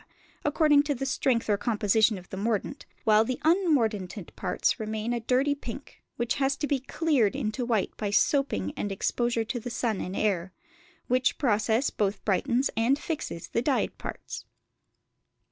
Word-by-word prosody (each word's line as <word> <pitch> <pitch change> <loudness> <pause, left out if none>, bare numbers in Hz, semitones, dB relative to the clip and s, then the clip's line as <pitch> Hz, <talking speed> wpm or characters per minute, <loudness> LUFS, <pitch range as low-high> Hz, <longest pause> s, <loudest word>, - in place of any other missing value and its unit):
according 295 -1 +4
to 290 -1 -1
the 270 - -3
strength 255 -3 +1
or 205 -2 +2
composition 215 -1 +2
of 180 -1 -12
the - - -6
mordant, 220 +6 -2 0.2
while 215 0 +5
the 250 +2 -3
unmordanted 230 - +1
parts 180 -2 0
remain 220 +2 -2
a 240 - -1
dirty 255 +5 +2
pink, 275 -1 -9
which 235 -1 0
has 270 0 +1
to 295 - -1
be 285 -2 0
"cleared" 265 -5 +1
into 245 -2 -2
white 225 -5 0
by 210 - -2
soaping 205 - +1
and 205 - -3
exposure 235 +4 0
to 240 +2 -3
the 240 - -6
sun 230 -3 -1
and 185 - -4
air; 190 -4 0 0.5
which 255 +1 +1
process 225 0 +2
both 205 -1 -1
brightens 240 +6 +1
and 235 +5 +3
fixes 300 - -5
the 230 - 0
dyed 270 +2 0
parts. - - -7
235 Hz, 160 wpm, -28 LUFS, 210-270 Hz, 0.5 s, while